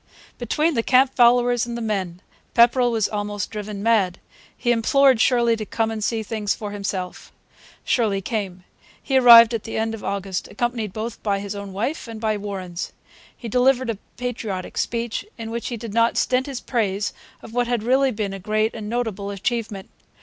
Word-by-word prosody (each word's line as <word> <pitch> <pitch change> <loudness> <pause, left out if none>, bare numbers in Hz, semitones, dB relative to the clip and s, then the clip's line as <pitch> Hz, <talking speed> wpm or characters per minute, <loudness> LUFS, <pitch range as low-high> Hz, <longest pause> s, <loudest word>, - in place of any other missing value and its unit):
Between 300 +7 +1
the 230 - +1
camp 260 +2 +4
followers 245 -1 +4
and 235 0 -4
the - - -4
men 195 -5 -3 0.3
Pepperrell 245 +1 +5
was 225 -3 +1
almost 205 -1 -4
driven 210 -1 -5
mad. 205 -6 +2 0.4
He 240 - +1
implored 255 +1 +4
Shirley 235 -2 +3
to 220 - -5
come 225 +1 -1
and 220 -1 -4
see 225 0 -1
things 210 -1 -2
for 210 -2 -6
himself. 195 -3 -5 0.5
Shirley 215 -5 +1
came. 195 -3 -4 0.4
He 270 - 0
arrived 235 -2 +9
at 225 - -2
the 225 - -5
end 225 0 -1
of 225 - -7
August 195 -2 -3
accompanied 230 -2 -2
both 220 +3 -5
by 200 -2 0
his 200 0 -5
own 200 -1 -7
wife 235 +10 -3
and 225 -1 -7
by 215 -1 0
Warren's. 190 -4 -5 0.4
He 235 - -7
delivered 250 +1 +2
a 210 - -7 0.2
patriotic 220 -7 -4
speech, 235 -1 -2
in 225 -1 -6
which 235 0 -4
he 240 - -4
did 225 -2 -7
not 230 +1 +2
stint 255 +2 +1
his 270 -3 -5
praise 205 -4 -1 0.3
of 230 - -11
what 245 0 +1
had 240 -3 -1
really 265 +3 +3
been 210 -4 -3
a 195 - -6
great 215 +3 0
and 215 -2 -6
notable 220 -4 -2
achievement. 200 -1 -3
225 Hz, 185 wpm, -22 LUFS, 205-240 Hz, 0.5 s, arrived